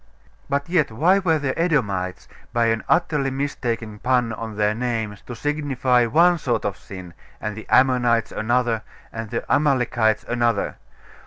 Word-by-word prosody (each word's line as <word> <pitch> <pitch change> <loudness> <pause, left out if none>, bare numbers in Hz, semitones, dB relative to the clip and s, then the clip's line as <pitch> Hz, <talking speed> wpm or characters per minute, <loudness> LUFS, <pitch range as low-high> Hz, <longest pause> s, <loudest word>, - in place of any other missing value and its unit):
But 140 0 -1
yet, 170 -4 +2
why 170 - +3
were 165 -5 +2
the 140 -3 -2
Edomites, 105 - 0 0.3
by 120 -1 +2
an 110 - -4
utterly 150 -5 +2
mistaken 120 -6 -3
pun 125 -1 +1
on 110 0 -6
their 105 0 +2
name, 115 -3 -2
to 120 - -6
signify 135 -4 +1
one 170 +8 +4
sort 125 -5 -1
of 100 - -1
sin, 95 -3 -10 0.3
and 105 -1 -4
the 110 - -9
Ammonites 125 -3 +3
another, 120 0 0 0.3
and 115 -1 -5
the - - -3
Amalekites 125 -6 +2
another? 120 -3 0
120 Hz, 150 wpm, -22 LUFS, 110-140 Hz, 0.3 s, one